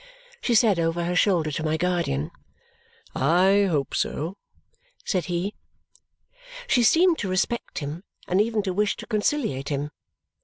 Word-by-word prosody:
she 240 - +1
said 210 -5 +4
over 165 +1 0
her 175 +1 -1
shoulder 175 -5 +2
to 150 - -3
my 155 0 0
guardian. 170 - -1 0.8
"I 185 +8 +3
hope 145 -5 -1
so," 165 +6 -2 0.7
said 185 -5 0
he. 175 +5 -2 1.1
She 255 - +3
seemed 330 +8 +4
to 200 - -2
respect 190 +6 -1
him 150 +4 -5 0.2
and 185 +3 +3
even 220 -1 0
to 190 -2 -2
wish 210 +2 0
to - - -8
conciliate 215 - -1
him. 145 0 -2
180 Hz, 145 wpm, -25 LUFS, 160-210 Hz, 1.1 s, said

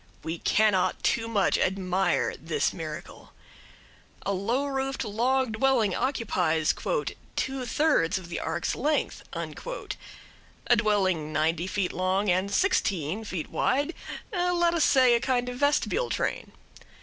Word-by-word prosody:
We 165 +1 -4
cannot 210 -4 +2
too 225 -1 +1
much 210 -4 +2
admire 190 0 +1
this 450 - -1
miracle. - - -8 0.9
A 200 - 0
low 230 +9 0
roofed 270 -1 -2
log 245 +4 +1
dwelling 230 -2 +2
occupies 180 - +1 0.6
"two 260 -1 -2
thirds 290 - +2
of 185 -2 -8
the 170 - -4
ark's 165 +1 -2
length" 300 +3 0
a - - -5
dwelling 190 -8 +1
ninety 160 +3 0
feet 190 -1 -1
long 185 +2 +1
and 185 +2 +1
sixteen 200 - +1
feet 185 -7 -5
wide, 285 +5 +1 0.4
let 350 -2 +2
us 335 -3 +3
say 255 -3 +5
a 235 - +4
kind 245 0 0
of 245 - -6
vestibule 290 - +1
train. - - -2
220 Hz, 125 wpm, -27 LUFS, 185-270 Hz, 0.9 s, say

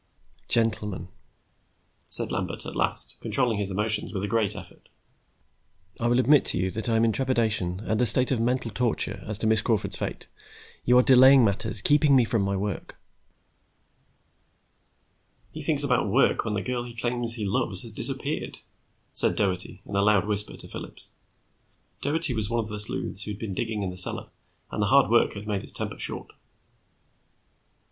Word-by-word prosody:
"Gentlemen," 110 -4 -2 1.0
said - - +8
Lambert - - -4
at - - -8
last, - - -1
controlling 120 -5 +1
his 100 -1 -2
emotions 105 +2 0
with 95 -2 -5
a - - -2
great 110 -2 0
effort. - - -13 1.1
"I 120 - -1
will 120 +1 +2
admit 140 +3 +4
to - - -2
you 95 +1 -2
that 110 +3 -5
I 115 - +1
am 115 +1 +2
in 115 - +1
trepidation 110 -8 -2
and 110 +1 -2
a 125 - +2
state 125 +4 +1
of 130 - 0
mental 120 0 -1
torture 120 +2 -3
as 105 -1 -4
to 110 - -5
Miss 110 0 +2
Crawford's 110 -3 -2
fate. - - -6 0.6
You 125 +1 +4
are 125 - +5
delaying 130 0 +6
matters, 105 +1 -3
keeping 145 +1 +3
me 125 -3 +4
from 115 -1 -1
my 100 0 -2
work." 100 +1 -5 2.6
"He - - -9
thinks - - +2
about - - 0
work - - +1
when 105 -2 -3
the 100 - -3
girl 125 +3 -3
he 120 -1 -10
claims 120 0 -1
he 110 -3 -4
loves 95 - +1
has - - +1
disappeared," - - -1 0.5
said - - +5
Doherty, 95 -1 -3
in 100 - -7
a 100 - +2
loud 100 -2 +2
whisper 105 0 -1
to - - -7
Phillips. - - -9 0.9
Doherty 155 0 +1
was 110 -2 -1
one 115 0 -1
of 105 - -10
the 105 - -5
sleuths 105 -1 0
who 105 - -5
had 100 - -11
been 105 -4 -5
digging 110 0 -4
in 95 - -4
the 90 - -10
cellar, 90 - +5 0.4
and - - -4
the 105 - +1
hard 135 +1 +3
work 120 -2 +2
had 100 +1 -8
made 105 -2 -3
his - - -1
temper - - -6
short. - - -2
110 Hz, 185 wpm, -25 LUFS, 100-120 Hz, 2.6 s, said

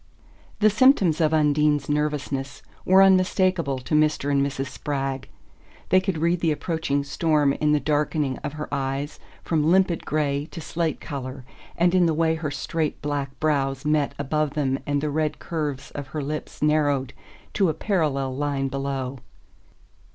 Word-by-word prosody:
The 215 0 +6
symptoms 200 - +4
of 155 -1 +3
Undine's 150 -2 +2
nervousness 145 -2 -2 0.2
were 190 +1 +6
unmistakable 185 -5 +3
to 130 +4 -6
Mr. 150 -2 +2
and 140 -1 +3
Mrs. 135 -1 -2
Spragg. 135 -1 -4 0.6
They 185 +1 +5
could 190 -3 -2
read 170 +2 +1
the 165 -2 +1
approaching 150 -2 -1
storm 145 0 +1
in 150 +1 +1
the 150 - +3
darkening 150 -2 0
of 145 - -5
her 150 0 -5
eyes 140 +1 -3 0.2
from 155 -2 +1
limpid 185 -2 +3
grey 145 -1 -1
to 170 - -8
slate 165 0 -2
colour, 130 -2 -6 0.3
and 175 +1 +3
in 180 -2 +4
the 160 - +1
way 160 0 +2
her 160 -2 -3
straight 150 +3 -2
black 145 -2 -3
brows 135 -3 0
met 150 -2 +1
above 150 +1 -1
them 135 -3 0
and 145 -1 0
the 150 0 -1
red 155 0 -1
curves 145 -5 -4
of 145 -2 -6
her 150 +1 -4
lips 150 +1 -5
narrowed 145 -3 +1 0.4
to 195 -4 +2
a - - 0
parallel 145 -10 0
line 140 -1 -1
below. 135 -1 -3
150 Hz, 160 wpm, -24 LUFS, 140-160 Hz, 0.6 s, The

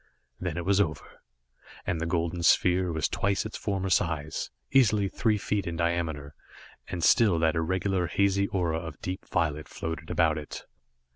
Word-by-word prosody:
Then - - -3
it 85 - -3
was 100 +1 +4
over, 75 -6 -4 0.6
and 80 -2 -1
the 85 - -1
golden 85 0 -1
sphere 90 +1 +3
was 80 -1 0
twice 100 +1 0
its 110 - -6
former 95 -2 -2
size 80 -4 0 0.2
easily 110 -7 +4
three 110 +2 +1
feet 100 -1 -2
in 85 - -3
diameter, 80 -4 -1 0.5
and 85 -2 -4
still 105 -7 +5
that 80 -1 +2
irregular, 90 +2 0
hazy 100 +1 +2
aura 85 -5 -1
of 80 -3 -8
deep 90 0 -5
violet 75 -3 -1
floated 80 -1 -5
about 80 -2 +2
it. 75 - -8
85 Hz, 160 wpm, -28 LUFS, 80-95 Hz, 0.6 s, still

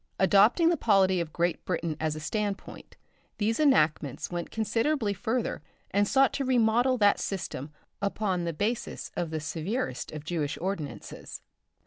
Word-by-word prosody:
Adopting 205 - +5
the 340 - +2
polity 190 -6 +3
of 160 -2 -5
Great 170 0 -1
Britain 165 -3 -2
as 155 -1 -1
a - - -5
standpoint, 205 +5 -4 0.4
these 225 +4 0
enactments 155 - +2
went 175 -1 -3
considerably 225 +2 0
further 230 +1 -2 0.3
and 205 +1 +2
sought 270 +2 +4
to 275 - -1
remodel 245 0 +3
that 205 -3 +4
system 155 -6 -4 0.3
upon 200 -3 -1
the 170 - -1
basis 210 +8 -3
of 170 - -2
the 160 0 -3
severest 160 - -3
of 155 -1 -7
Jewish 155 -3 -2
ordinances. 175 -5 -5
200 Hz, 145 wpm, -28 LUFS, 165-225 Hz, 0.4 s, Adopting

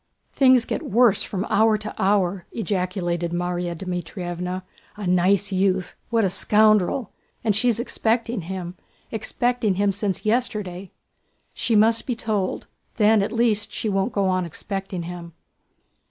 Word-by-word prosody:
"Things 255 -3 +5
get - - -3
worse 220 -2 +3
from 195 -1 -3
hour 220 0 +3
to 215 0 -6
hour!" 190 -2 +1
ejaculated 180 -5 -2
Márya 175 0 -2
Dmítrievna. 180 +1 -4 0.3
"A 210 -1 -6
nice 185 +3 +2
youth! 190 -1 +1 0.2
What 230 -3 +2
a - - +2
scoundrel! 215 +3 +3 0.3
And 215 -3 +2
she's 235 +1 +2
expecting 230 -2 -1
him—expecting 200 +5 -3
him 200 +1 +2
since 200 0 -3
yesterday. 210 -5 -1 0.6
She 230 - 0
must 225 +2 +3
be 250 - -1
told! 215 -4 -2 0.3
Then 215 -1 +4
at 200 - -1
least 230 -3 +1
she 220 - -2
won't 195 -1 0
go 200 -1 0
on 185 0 +1
expecting 190 +1 -5
him." 170 -1 -8
200 Hz, 135 wpm, -23 LUFS, 180-220 Hz, 0.6 s, Things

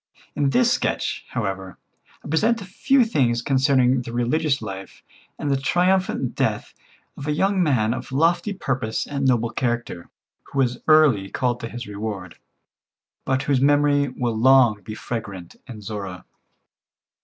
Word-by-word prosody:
In 145 -2 +1
this 240 - +3
sketch, - - -2
however, 95 -1 -4 0.5
I - - -7
present 220 +10 +2
a 200 - -8
few 250 +7 +2
things 120 - +1
concerning 130 -2 +3
the 120 - -7
religious 135 +5 0
life 95 -3 -8 0.3
and 145 - -2
the 135 - +2
triumphant 180 -4 +1
death - - -2 0.4
of 140 - -8
a - - +1
young 190 +5 +1
man 120 -9 +2
of 130 - -7
lofty 165 +8 +1
purpose 130 - -2
and 140 -1 -2
noble 120 -2 +1
character, 120 -9 -3 0.4
who - - -9
was 125 -2 +1
early 145 -11 +4
called 120 +1 -1
to 115 - -6
his 120 +2 -7
reward, 100 -3 -6 0.9
but 130 0 0
whose 140 -2 +1
memory 145 0 +3
will 125 -3 -3
long 120 -3 +4
be 110 +3 -8
fragrant 100 -7 -6
in 115 -5 -9
Zorra. 100 -3 -6
130 Hz, 150 wpm, -23 LUFS, 110-145 Hz, 0.9 s, early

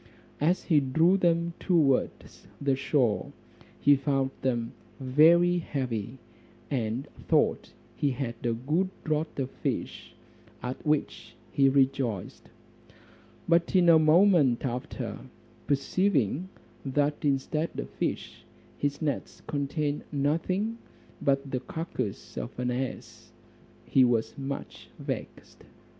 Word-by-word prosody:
As 170 +5 +2
he 155 -4 +4
drew 160 +7 +3
them 170 -2 +1
towards 155 -8 0
the 140 -1 +1
shore, 130 -5 0 0.5
he 145 +1 +6
found 135 -1 0
them 120 -3 -1 0.3
very 165 +7 +5
heavy, 125 -6 -3 0.5
and 120 -1 -2 0.2
thought - - +2 0.2
he 145 - +1
had 130 -2 -3
a 120 -1 +1
good 150 +11 0
draught 155 -1 -2
of 135 -1 -2
fish, - - -4 0.5
at 125 +1 -5
which 150 -1 -1 0.2
he 135 -1 +4
rejoiced; 130 -7 0 1.0
but 170 +2 +2
in 175 -2 +6
a 165 -1 +8
moment 155 -6 +4
after, 125 0 -4 0.5
perceiving 150 - +1 0.3
that 145 +2 0
instead 150 +3 0
of - - -4
fish - - -4 0.4
his 145 +2 -1
nets 145 -2 -3
contained 145 0 -2
nothing 180 +10 0 0.4
but 135 0 +1
the 130 - 0
carcass 125 - -5
of - - -5
an 125 0 -1
ass, 130 +1 -5 0.5
he 135 - +4
was 115 -2 +1
much 140 0 -6
vexed. - - -7
140 Hz, 115 wpm, -28 LUFS, 130-160 Hz, 1.0 s, a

